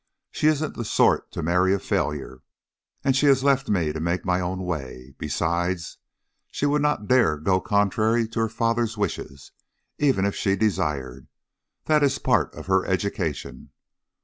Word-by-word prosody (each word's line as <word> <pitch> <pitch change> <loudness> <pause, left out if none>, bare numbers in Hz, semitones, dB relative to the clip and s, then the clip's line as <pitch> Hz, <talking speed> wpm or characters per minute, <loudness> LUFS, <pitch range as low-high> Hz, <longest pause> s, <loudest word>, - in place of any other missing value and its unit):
She 150 - 0
isn't 155 0 +1
the 115 - -4
sort 105 - +2
to 85 - -5
marry 90 +4 +2
a - - -3
failure, 70 -7 -3 0.6
and 135 - +2
she 145 +2 +3
has 135 -1 +4
left 135 -1 +2
me 85 -7 +1
to 80 - -4
make 85 +3 -2
my 90 -1 +1
own 90 +1 -3
way. 70 -6 -6
Besides, 85 +3 -2 0.5
she - - -2
would 145 +1 +2
not 150 -8 0
dare 125 -11 +3
go 95 +5 +1
contrary 110 +3 +1
to 115 - -4
her 115 0 +1
father's 115 0 -1
wishes, 70 -8 -4 0.5
even 135 -10 +2
if 100 - 0
she 95 -1 +1
desired 75 - -2 0.6
that 155 -1 +3
is 140 -1 +2
part 115 - +1
of - - -9
her 95 0 +2
education. 95 -4 -3
95 Hz, 165 wpm, -24 LUFS, 85-120 Hz, 0.6 s, has